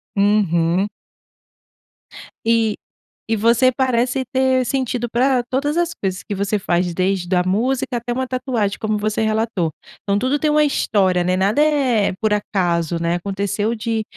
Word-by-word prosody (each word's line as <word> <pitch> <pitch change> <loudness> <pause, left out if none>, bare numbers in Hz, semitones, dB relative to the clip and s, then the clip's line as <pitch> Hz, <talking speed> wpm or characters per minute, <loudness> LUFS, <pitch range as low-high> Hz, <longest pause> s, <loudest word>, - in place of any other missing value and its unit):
Uhum. 195 -3 +2 1.6
E 225 -2 +2 0.6
e 225 - +3
você 235 +4 +3
parece 255 0 0
ter 260 -1 +2
sentido 245 -2 -1
pra 250 +2 +1
todas 290 +4 0
as 345 -1 +1
coisas 190 - -4
que - - -3
você 200 +2 -1
faz, 175 -2 -1
desde 185 0 0
a 180 - +3
música, 245 +7 0
até 235 +1 -5
uma 260 +2 -1
tatuagem, 250 -6 -2
como 215 -1 0
você 215 +1 -1
relatou. 220 -5 0 0.3
Então, 200 0 0
tudo 260 +6 0
tem 305 - +1
uma 300 0 +4
história, 190 -10 +1
né. 180 +1 +1
Nada 205 +9 +2
é 270 -9 +2
por 215 -1 +1
acaso, 175 -5 0
né. 170 +1 0
Aconteceu 200 +3 -2
de 225 0 -2
220 Hz, 150 wpm, -20 LUFS, 195-255 Hz, 1.6 s, uma